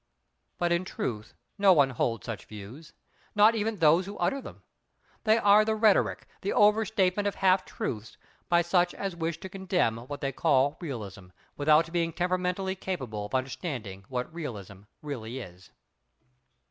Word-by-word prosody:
But 175 Hz, -1 st, 0 dB
in 170 Hz, +1 st, +2 dB
truth, 110 Hz, -, -5 dB, 0.2 s
no 195 Hz, -2 st, +7 dB
one 140 Hz, -5 st, +4 dB
holds 115 Hz, -3 st, -1 dB
such 115 Hz, -4 st, -6 dB
views. 110 Hz, +10 st, -11 dB, 0.4 s
Not 210 Hz, +2 st, +6 dB
even 220 Hz, 0 st, -1 dB
those 165 Hz, +1 st, +4 dB
who 200 Hz, -, -7 dB
utter 275 Hz, 0 st, 0 dB
them. -, -, -11 dB, 0.6 s
They 220 Hz, 0 st, +5 dB
are 205 Hz, -1 st, +6 dB
the 220 Hz, 0 st, 0 dB
rhetoric, 215 Hz, -2 st, +3 dB, 0.2 s
the 200 Hz, -, -1 dB
over 210 Hz, +1 st, +4 dB
statement 205 Hz, -1 st, +1 dB
of 200 Hz, -, -2 dB
half 185 Hz, -1 st, +3 dB
truths, 110 Hz, 0 st, -5 dB, 0.3 s
by 175 Hz, 0 st, +4 dB
such 175 Hz, 0 st, +2 dB
as 195 Hz, -3 st, -4 dB
wish 165 Hz, -1 st, -3 dB
to -, -, -6 dB
condemn 185 Hz, -, 0 dB
what 130 Hz, +5 st, -8 dB
they 135 Hz, -, -1 dB
call 140 Hz, 0 st, +2 dB
"Realism," 105 Hz, -, -6 dB, 0.3 s
without 155 Hz, +3 st, +3 dB
being 165 Hz, -1 st, 0 dB
temperamentally 180 Hz, +2 st, -1 dB
capable 130 Hz, -, -4 dB
of 130 Hz, -, -5 dB
understanding 130 Hz, -, -4 dB
what 125 Hz, +3 st, -4 dB
"Realism" 105 Hz, -, -7 dB, 0.2 s
really 125 Hz, -5 st, -5 dB
is. 90 Hz, -7 st, -10 dB
165 Hz, 160 wpm, -28 LUFS, 125-190 Hz, 0.6 s, no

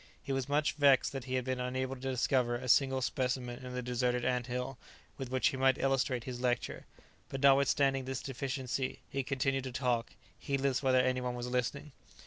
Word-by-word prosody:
He -, -, -4 dB
was 135 Hz, 0 st, -1 dB
much 150 Hz, +1 st, +2 dB
vexed 140 Hz, -3 st, +4 dB
that 135 Hz, -3 st, -5 dB
he 130 Hz, 0 st, -2 dB
had 130 Hz, -1 st, -1 dB
been 130 Hz, -1 st, -1 dB
unable 130 Hz, +1 st, -2 dB
to 130 Hz, -, -9 dB
discover 125 Hz, -1 st, +1 dB
a 125 Hz, +1 st, -5 dB
single 130 Hz, +1 st, +4 dB
specimen 125 Hz, 0 st, -2 dB
in 125 Hz, 0 st, -6 dB
the 125 Hz, -, -3 dB
deserted 125 Hz, 0 st, 0 dB
anthill 125 Hz, +1 st, -2 dB, 0.4 s
with 135 Hz, -2 st, -6 dB
which 130 Hz, 0 st, +2 dB
he 130 Hz, -, -4 dB
might 130 Hz, 0 st, +4 dB
illustrate 135 Hz, -2 st, +1 dB
his 125 Hz, -1 st, -6 dB
lecture, 125 Hz, -1 st, -1 dB, 0.4 s
but 135 Hz, -, -4 dB
notwithstanding 135 Hz, -1 st, +4 dB
this 130 Hz, 0 st, -4 dB
deficiency 135 Hz, 0 st, -3 dB
he 135 Hz, -, 0 dB
continued 135 Hz, 0 st, -1 dB
to 130 Hz, -, -4 dB
talk, 120 Hz, -2 st, -1 dB, 0.3 s
heedless 140 Hz, -1 st, 0 dB
whether 130 Hz, -2 st, +4 dB
any 130 Hz, 0 st, +1 dB
one 125 Hz, -1 st, -2 dB
was 120 Hz, 0 st, -4 dB
listening. 125 Hz, +4 st, -2 dB
130 Hz, 190 wpm, -32 LUFS, 125-135 Hz, 0.4 s, vexed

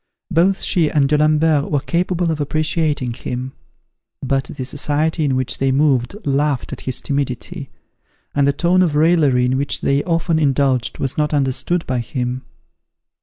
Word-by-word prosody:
Both 185 Hz, +4 st, +2 dB
she 165 Hz, -6 st, +2 dB
and 140 Hz, -2 st, +2 dB
D'Alembert 150 Hz, 0 st, +2 dB
were 145 Hz, -, +1 dB
capable 175 Hz, +3 st, -1 dB
of 155 Hz, -2 st, -3 dB
appreciating 150 Hz, -3 st, -1 dB
him; 125 Hz, +2 st, -5 dB, 0.7 s
but 135 Hz, 0 st, 0 dB
the 130 Hz, -3 st, -6 dB
society 155 Hz, +4 st, 0 dB
in 135 Hz, -3 st, +1 dB
which 130 Hz, -1 st, -1 dB
they 135 Hz, 0 st, +1 dB
moved 135 Hz, +1 st, +1 dB
laughed 140 Hz, -1 st, 0 dB
at -, -, -7 dB
his 130 Hz, -, -2 dB
timidity, 140 Hz, -3 st, -3 dB, 0.6 s
and 140 Hz, -1 st, +2 dB
the -, -, +4 dB
tone 175 Hz, +6 st, +2 dB
of 165 Hz, -5 st, +1 dB
raillery 150 Hz, -6 st, +3 dB
in 130 Hz, +1 st, +1 dB
which 140 Hz, -, -1 dB
they 140 Hz, +1 st, +1 dB
often 165 Hz, -1 st, 0 dB
indulged 135 Hz, -4 st, +1 dB
was 135 Hz, +2 st, -3 dB
not 150 Hz, 0 st, +1 dB
understood 140 Hz, +5 st, 0 dB
by 130 Hz, -1 st, -1 dB
him. 125 Hz, +1 st, -3 dB
145 Hz, 160 wpm, -19 LUFS, 130-160 Hz, 0.7 s, the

